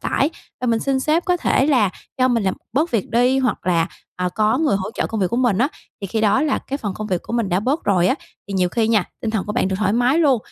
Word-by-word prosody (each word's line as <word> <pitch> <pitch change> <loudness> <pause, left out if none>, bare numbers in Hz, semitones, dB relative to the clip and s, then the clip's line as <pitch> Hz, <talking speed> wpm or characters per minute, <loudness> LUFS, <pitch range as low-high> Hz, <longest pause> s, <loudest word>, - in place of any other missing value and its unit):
tải, 285 +4 +1 0.3
và 250 - -2
mình 230 -1 +2
xin 270 -1 0
sếp 310 +5 +1
có 360 -2 +2
thể 270 -5 +2
là 245 -10 +3 0.3
cho 255 - +4
mình 235 -4 +1
làm 190 -1 0 0.2
bớt 305 +7 +1
việc 225 -5 -1
đi, 250 +3 +3
hoặc 255 -8 -1
là, 170 -2 +2 0.3
ờ, 180 0 0
có 215 +4 +2
người 305 -10 +2
hỗ 190 +1 -4
trợ - - -1
công 220 -2 -3
việc 185 - +3
của 235 - -1
mình 245 -6 +2
á. 265 +4 +3 0.3
Thì 195 - -4
khi 220 +4 -2
đó 215 +5 +3
là 300 -3 +1
cái 275 - -5
phần 205 -9 -4
công 215 - -5
việc 185 -4 -1
của - - -8
mình 230 -5 0
đã 180 +2 +1
bớt 275 +8 -1
rồi 180 -3 +3
á, - - +3 0.3
thì 200 - -4
nhiều 180 -1 +2
khi 225 +3 0
nha, 215 -5 +3 0.2
tinh 220 - -2
thần 215 -4 -1
của 210 - -3
bạn 190 - +1
được 190 - -1
thoải 210 -1 +1
mái 245 +6 +3
luôn. 280 -7 +4
230 Hz, 295 wpm, -20 LUFS, 200-265 Hz, 0.3 s, cho